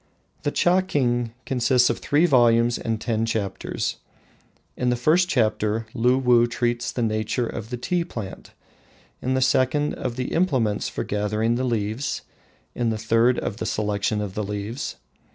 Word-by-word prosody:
The 145 - 0
"Chaking" 145 -10 +1
consists 125 0 +3
of - - -4
three 150 +4 +2
volumes 120 -5 +4
and 115 -1 -2
ten 115 -1 -1
chapters. 110 -3 -2 0.8
In 125 - 0
the 125 - +2
first 160 +9 +3
chapter 110 -4 +1
Luwuh 125 -1 +3
treats 120 0 -1
of - - -7
the 120 - 0
nature 110 +2 0
of 115 -1 -6
the 125 - -4
tea 175 +8 0
plant, 110 - -8 0.7
in 130 +1 0
the 130 - +1
second 130 +3 +2
of 125 -2 -4
the 125 0 -3
implements 130 - +1
for - - -4
gathering 105 +2 0
the 125 +2 -1
leaves, 115 +2 -2 0.5
in 120 -1 0
the 110 - -1
third 115 +3 +3
of 100 - -3
the - - -4
selection 105 0 -1
of 100 -2 -4
the 105 - -2
leaves. 105 +5 -4
120 Hz, 160 wpm, -24 LUFS, 110-130 Hz, 0.8 s, volumes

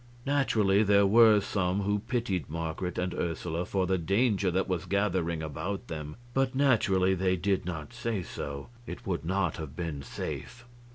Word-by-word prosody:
Naturally 110 -8 +3
there 100 -1 +5
were 110 +1 +7
some 95 -1 0
who 105 +1 +1
pitied 100 -7 -2
Marget 85 +3 -3
and 90 0 -1
Ursula 85 0 -2
for 95 -2 0
the 95 0 +1
danger 100 +2 +2
that 95 +2 0
was 90 -4 -2
gathering 90 -5 0
about 90 +7 -4
them, 75 -2 -5 0.2
but 135 0 +1
naturally 100 -9 +3
they 95 0 +1
did 95 0 0
not 80 -5 -5
say 110 -6 -2
so; 70 -1 -6 0.2
it 90 - -7
would 90 -4 -2
not 95 -1 0
have 75 -3 -7
been 80 -5 -4
safe. 120 - -6
95 Hz, 165 wpm, -29 LUFS, 85-105 Hz, 0.2 s, were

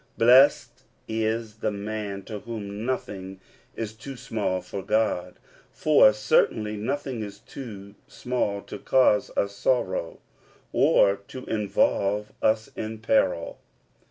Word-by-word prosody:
Blessed 125 0 +5 0.3
is 110 0 -2
the - - -1
man 100 -1 -5
to 105 0 -6
whom 105 -1 -6
nothing 95 -7 -4 0.4
is 110 -1 -4
too 135 +5 -9
small 105 -6 -2
for 95 +2 -6
God; 100 -3 0 0.4
for 150 -8 +5
certainly 105 0 +1
nothing 130 +2 -3
is 100 -1 -7
too 100 -3 -10
small 120 -5 -2
to 105 - -8
cause 125 -2 +3
us 100 0 0
sorrow, 100 -7 0 0.6
or 100 0 +4
to 130 - -9
involve 105 -1 0
us 110 0 +2
in 110 0 -5
peril. 105 -6 +1
110 Hz, 120 wpm, -26 LUFS, 100-115 Hz, 0.6 s, Blessed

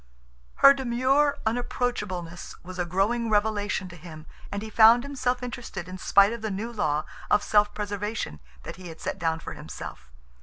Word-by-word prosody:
Her 275 - +8
demure 270 +3 +2
unapproachableness 210 -7 -3
was 185 +1 -9
a 175 - +1
growing 225 +6 +1
revelation 205 -2 0
to 175 - -11
him, 160 -2 -11 0.3
and 200 +1 -3
he 220 - -7
found 230 +3 +7
himself 260 -3 -2
interested 240 -7 -6
in 185 0 -8
spite 200 +3 +5
of 235 - -6
the 220 - -2
new 215 +4 -4
law 155 -8 0 0.2
of 205 - +3
self 210 0 +3
preservation 205 - -3 0.4
he 185 -1 -10
had 165 -1 -10
set - - -4
down 165 -1 0
for - - -7
himself. 60 0 -9
210 Hz, 165 wpm, -26 LUFS, 180-240 Hz, 0.4 s, Her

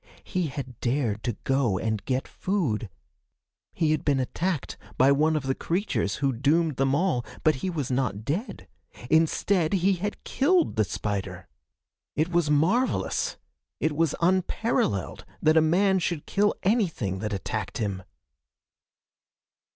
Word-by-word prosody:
He 180 -3 -1
had 130 -4 -7
dared 120 -4 0
to 120 -3 -2
go 135 -8 +1
and 110 0 -2
get 130 0 -1
food! 140 - -1 0.8
He 160 -2 +1
had 155 -2 0
been 140 -2 +2
attacked 160 +4 -2 0.2
by 130 +2 +5
one 155 +3 +3
of 150 - -1
the 135 0 0
creatures 170 - -1
who 135 -1 0
doomed 150 +4 +1
them 135 0 +2
all, 150 -7 +1 0.2
but 155 -3 +3
he 185 - -2
was 150 -7 -3
not 125 -5 -1
dead! 150 - -3 0.4
Instead, 160 +2 +2
he 195 +1 +3
had 205 +3 -4
killed 340 +5 +2
the 110 - +2
spider! 95 -4 -4 0.7
It 155 +3 +1
was 170 -3 +1
marvelous! 180 - +1 0.4
It 155 -1 0
was 165 -1 +1
unparalleled 180 - 0 0.2
that 155 +1 +3
a 160 - +6
man 190 +4 +3
should 170 -3 -2
kill 205 +1 +1
anything 170 - 0
that 105 +1 -3
attacked 105 +1 -3
him! 100 -5 -2
150 Hz, 145 wpm, -26 LUFS, 120-175 Hz, 0.8 s, a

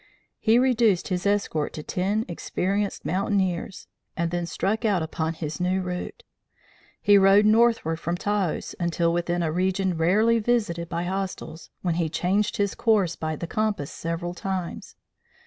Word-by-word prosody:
He 225 +1 +4
reduced 235 -8 +3
his 185 +1 -1
escort 200 -7 0
to 155 - -6
ten 200 +7 -1
experienced 195 +3 -2
mountaineers 190 0 -1 0.3
and 170 0 0
then 175 -1 -2
struck 200 +7 -1
out 200 -7 +2
upon 160 0 -2
his 155 0 -5
new 185 +1 +1
route. 180 - -5 0.8
He 205 -1 +5
rode 195 +2 +6
northward 220 -7 +3
from 170 +2 -2
Taos 205 -3 -1
until 170 -1 +1
within 175 0 0
a 160 - 0
region 185 +1 0
rarely 210 +8 +3
visited 210 -8 0
by 170 -1 -2
hostiles, 185 -3 -5
when 175 -3 +1
he 160 - 0
changed 190 +6 0
his 200 -1 0
course 205 -7 +2
by 155 0 -3
the 170 - -5
compass 205 -6 -1
several 170 +1 -4
times. 185 -1 -5
185 Hz, 150 wpm, -25 LUFS, 170-205 Hz, 0.8 s, rode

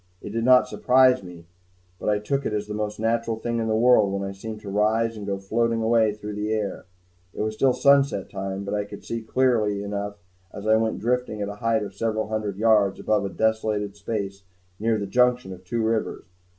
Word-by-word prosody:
It - - -8
did 115 +1 -2
not 125 +1 +6
surprise 130 0 +4
me, 90 -3 -11 0.5
but - - -2
I 105 - +3
took 135 +7 -2
it 110 - -2
as 105 0 -1
the 105 - -6
most 105 0 -3
natural 115 0 0
thing 115 +1 -2
in 115 - -1
the 110 - +1
world 110 -3 +5
when 100 0 -2
I - - -4
seemed 110 +2 -7
to 100 - -8
rise 110 +3 +1
and 105 -2 -7
go 100 -1 -1
floating 115 +3 0
away 110 -1 +3
through 105 0 -7
the 105 +1 -3
air. 105 -2 -2 0.5
It - - -2
was 110 0 -2
still 130 +4 +3
sunset 140 -5 +3
time, 95 0 -5
but 100 +1 -4
I 105 0 0
could 100 0 -10
see 115 0 -3
clearly 110 -4 +1
enough 100 0 -4 0.4
as 100 - -8
I 110 0 +5
went 110 0 0
drifting 125 -1 -1
at 100 0 -2
a 105 - -7
height 115 -2 +1
of 100 -1 -7
several 110 +1 -2
hundred 105 -3 -3
yards 105 -3 +3
above 105 -2 +1
a - - 0
vast - - -11
desolated 110 -2 0
space 100 -1 -4 0.4
near 110 +1 +1
the 100 - -3
junction 125 -1 +2
of 90 0 -13
two 115 +5 -2
rivers. 110 -5 -1
110 Hz, 225 wpm, -24 LUFS, 100-115 Hz, 0.5 s, not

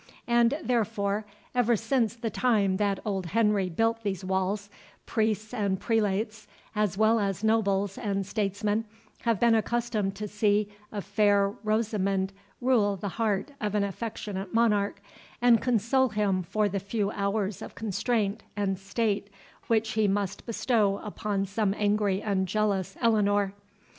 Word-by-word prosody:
And 235 +3 +3
therefore, 215 -3 0 0.3
ever 240 -1 +3
since 225 0 0
the 230 -2 -3
time 205 -7 +2
that 200 -1 +1
old 195 -4 -2
Henry 210 -1 +2
built 225 +6 +1
these 195 -3 -3
walls, 190 +2 -1 0.4
priests 220 0 -1
and 200 -5 0
prelates, 215 0 0 0.3
as 210 -3 0
well 220 +2 +4
as 200 -1 -1
nobles 200 -3 +1
and 200 -3 -1
statesmen, 205 +2 -1 0.4
have 230 -4 +2
been 235 -1 +5
accustomed 220 -3 0
to 210 +1 -4
see 210 0 +1 0.2
a 205 - -3
fair 205 -1 +3
Rosamond 200 -3 0 0.3
rule 230 -6 +3
the 195 +2 -4
heart 220 +5 -1
of 210 -1 -1
an 205 - +2
affectionate 200 -1 -4
monarch, 205 -3 +2 0.4
and 240 -2 +5
console 250 +2 +2
him 205 -3 +1
for 210 +4 0
the 200 0 -2
few 200 +1 -1
hours 200 -1 -1
of - - -8
constraint 215 0 -1 0.2
and 195 -2 0
state 200 +1 -1 0.4
which 225 -1 +2
he 215 -1 +2
must 200 +1 -2
bestow 220 -4 +1
upon 205 -1 -2
some 200 0 0
angry 205 -2 +1
and 195 -3 0
jealous 195 -1 0
Eleanor. 205 -3 +2
210 Hz, 145 wpm, -28 LUFS, 200-225 Hz, 0.4 s, been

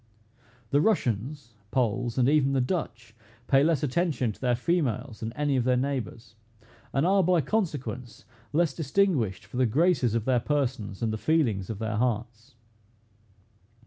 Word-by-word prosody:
The 145 - +4
Russians, 130 - -1 0.2
Poles, 120 -1 -1
and 125 -1 +3
even 140 -2 +3
the 135 - +2
Dutch, 125 -6 -3 0.3
pay 135 +2 +4
less 160 -3 +2
attention 150 -4 0
to - - -15
their 125 -2 +2
females 125 -5 -1
than 110 0 -4
any 145 -1 0
of 125 - +1
their 125 0 +2
neighbors, 125 -4 -3 0.6
and 135 +3 +1
are, 195 +2 +4
by 180 -1 +3
consequence, 135 - -3 0.3
less 160 -1 +2
distinguished 140 - 0
for 105 +4 -8
the 130 -1 +3
graces 140 - +2
of 115 -2 -1
their 130 -2 +3
persons, 120 -6 -2
and 110 -1 0
the 110 - -4
feelings 115 - +1
of 110 - -4
their 110 0 -3
hearts. 120 +1 -2
125 Hz, 155 wpm, -27 LUFS, 115-150 Hz, 0.6 s, The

